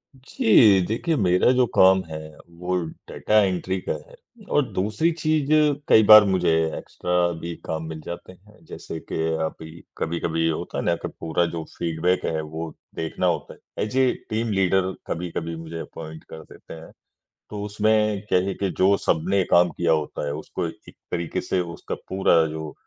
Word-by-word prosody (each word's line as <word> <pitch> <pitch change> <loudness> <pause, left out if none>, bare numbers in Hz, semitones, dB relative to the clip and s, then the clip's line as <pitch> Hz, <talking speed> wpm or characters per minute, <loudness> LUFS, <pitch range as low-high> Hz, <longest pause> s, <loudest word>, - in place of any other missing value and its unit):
जी, 110 -6 +4
देखिए 140 - -1
मेरा 90 +1 +3
जो 125 0 +3
काम 95 0 +6
है, 80 0 -5 0.3
वो 90 +2 -4 0.3
डेटा 110 0 +2
एंट्री 95 0 -1
का - - +2 0.2
है - - -15 0.4
और 145 - +5
दूसरी 105 - 0
चीज़ 155 -3 0 0.4
कई 110 - +6
बार 110 -1 +11
मुझे 95 -3 +1 0.3
एक्स्ट्रा 90 - -4 0.2
भी 85 0 -5
काम 80 0 -3
मिल 80 -1 -7
जाते 85 +1 -8
हैं। 105 +4 -22
जैसे 80 - -8
कि - - -8 0.3
अभी 80 +1 -8 0.2
कभी-कभी 80 0 -1
होता 80 - -4
है - - -1
ना, - - +2
कि - - -6
पूरा 80 +1 0
जो 80 - -4
फीडबैक 85 +2 0
है, 80 -1 -1
वो 80 +1 -6 0.2
देखना 80 -1 -2
होता - - -2
है। - - -20 0.3
ऐज़ 110 +5 -4
ए 130 -1 +4 0.2
टीम 110 +1 -1
लीडर 95 -1 +2 0.2
कभी-कभी 85 -1 -4
मुझे 80 0 -7
अपॉइंट 80 -1 -9
कर 80 - -9
देते - - -13
हैं। 80 0 -11 0.6
तो 105 -1 -5
उसमें 105 0 +1
क्या 90 - +3
है 100 - -1
कि 100 -2 -2
जो 95 +2 +4
सबने 95 +4 +1
काम 90 0 +5
किया 85 -1 0
होता 75 -1 -1
है, 70 - -2
उसको 75 - -4
एक - - -12 0.2
तरीके 85 -1 -2
से 95 - -1 0.2
उसका - - -6
पूरा 95 -4 +3
जो 80 0 -6
90 Hz, 175 wpm, -23 LUFS, 80-105 Hz, 0.6 s, बार